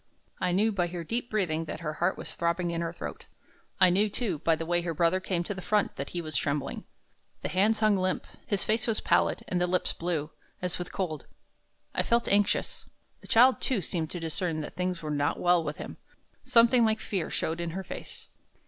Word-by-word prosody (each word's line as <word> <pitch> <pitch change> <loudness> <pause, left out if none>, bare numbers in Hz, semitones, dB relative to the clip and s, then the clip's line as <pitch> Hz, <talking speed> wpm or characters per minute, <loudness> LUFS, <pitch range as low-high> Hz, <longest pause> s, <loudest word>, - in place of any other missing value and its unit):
I 180 - +1
knew 210 +5 +3
by 180 -4 0
her 175 -1 -5
deep 235 +7 -2
breathing 165 -7 0
that 160 - -6
her 155 -2 -3
heart 180 +2 +2
was - - -5
throbbing 170 +1 0
in 170 0 -2
her 165 -1 -2
throat. 175 - -7 0.5
I 185 -2 +6
knew, 205 +4 +3
too, 200 - -2
by 165 +1 +3
the 165 +1 -4
way 175 +1 +1
her 170 -1 -3
brother 170 +3 +3
came 185 -2 -1
to 205 - -3
the 190 - -7
front, 210 +1 +1
that 140 - -4
he 175 -1 -4
was 155 -2 -6
trembling. 140 +3 -1 0.6
The - - -1
hands 210 +4 +2
hung 215 -1 +5
limp: 185 0 0 0.2
his 200 -2 +1
face 220 +2 +1
was 225 -2 +1
pallid, - - +2
and 180 -1 0
the 180 - +2
lips 180 +1 0
blue, 165 -3 -2 0.3
as 180 -1 -2
with 175 - -5
cold. 170 -6 -3 0.7
I - - +2
felt 235 0 +1
anxious. 205 0 +1 0.3
The - - -13
child, 250 +3 +6
too, 255 -7 +1
seemed 160 -1 -2
to 175 - -4
discern 165 0 -2
that 150 - -7
things 180 -2 -2
were 155 - -3
not 145 0 0
well 175 -1 +4
with 150 -1 -4
him. - - -7 0.5
Something 240 -1 +5
like 220 -1 +2
fear 190 -6 -2
showed 165 +2 -2
in 170 - -2
her 190 - -3
face. - - -8
180 Hz, 220 wpm, -29 LUFS, 165-205 Hz, 0.7 s, I